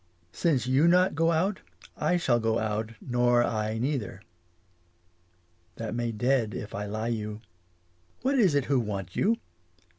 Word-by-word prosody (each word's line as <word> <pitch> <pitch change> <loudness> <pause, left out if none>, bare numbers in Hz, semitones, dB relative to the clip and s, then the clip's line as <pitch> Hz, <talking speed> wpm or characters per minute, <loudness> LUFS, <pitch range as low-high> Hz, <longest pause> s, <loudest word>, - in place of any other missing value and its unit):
Since 135 - +1
you 135 +6 +3
not 180 +2 +4
go 165 +2 +2
out, 185 +5 +1 0.4
I 180 - +1
shall 125 -8 +2
go 115 0 +1
out 110 0 -2
nor 120 -1 +2
I 110 -1 -1
neither. 120 -4 -3 1.5
That 115 -1 -5
may 120 0 -1
dead 115 -2 0
if 105 - -6
I 105 +1 -4
lie 110 +3 -3
you. 105 -2 -4 0.8
What 270 - +2
is 185 -10 +4
it 140 -2 +2
who 140 -2 +2
want 100 -6 -4
you 225 +4 +2
120 Hz, 150 wpm, -28 LUFS, 110-145 Hz, 1.5 s, not